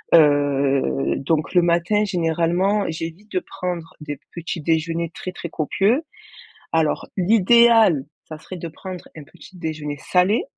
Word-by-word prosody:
Heu, 140 -3 +3
donc 155 +2 -1
le 180 - +5
matin 175 +5 +2
généralement, 175 +3 +1
j'évite 165 +6 -6
de 185 - -1
prendre 180 -3 -5
des 145 -2 -6 0.2
petits 170 0 -5
déjeuners 165 +1 -1
très, 185 - -6
très 170 - -7
copieux. 200 - +1 0.7
Alors 160 -2 +1
l'idéal, 220 - +5 0.2
ça 155 - -8
serait 185 +4 -9
de 170 - -6
prendre 180 +2 -9
un 155 - -9
petit 185 +6 -16
déjeuner 155 -3 -4
salé 180 +9 +2
170 Hz, 135 wpm, -22 LUFS, 155-190 Hz, 0.7 s, le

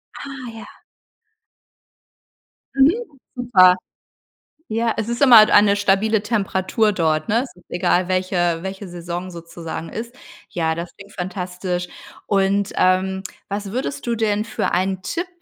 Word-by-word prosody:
Ah, 265 -3 -8
ja. 225 - -10 2.1
Mhm, 275 +3 +6 0.4
super. 195 -8 +5 0.9
Ja, 225 +1 0
es 225 +1 -3
ist 235 +3 -3
immer 250 -5 +9
halt 215 0 +6
eine 205 -1 +6
stabile 205 +2 +2
Temperatur 210 0 0
dort, 155 -3 0
ne? 225 +3 +2
Es 270 - -11
ist 180 - -20
egal, 175 +1 +1
welche 180 -2 0
welche 190 +1 -6
Saison 175 +1 -6
sozusagen 170 -1 -7
ist. 235 +3 -7 0.3
Ja, 160 -2 -1
das 170 +1 -7
klingt 200 0 -14
fantastisch. 180 -1 -4 0.4
Und, 200 0 +1
ähm, 190 +1 +2 0.3
was 200 0 -4
würdest 265 0 -3
du 235 - +1
denn 215 -1 0
für - - -2
ein 185 +1 0
Tipp, 340 - -3
195 Hz, 135 wpm, -21 LUFS, 180-220 Hz, 2.1 s, immer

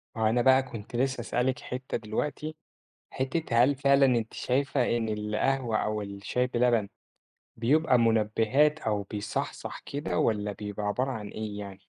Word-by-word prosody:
ما 110 - -4
هو - - +4
أنا 120 +2 +2
بقى 130 +1 +5
كنت 115 -3 -9
نفسي 130 0 0
أسألِك 125 +2 0
حتّة 130 +1 -4
دلوقتي، 150 +8 -3 0.6
حتّة 130 -3 +1
هل 140 +3 +3
فعلًا 140 0 +4
أنتِ 120 -4 +1
شايفة 130 -2 +1
إن 115 -1 -2
القهوة 110 +3 0
أو 105 0 -1
الشاي 100 +5 -2
بلبن 120 -4 +2 0.7
بيبقى 130 +3 +3
منبهات، 115 +6 +3
أو 105 -5 -1
بيصحصح 105 +1 -4
كده، 115 -12 -3
والّا 105 -2 +1
بيبقى 105 0 -5
عبارة 125 +7 0
عن 110 -5 -5
إيه 105 -1 -5
يعني؟ 100 -1 -9
120 Hz, 150 wpm, -28 LUFS, 105-130 Hz, 0.7 s, بقى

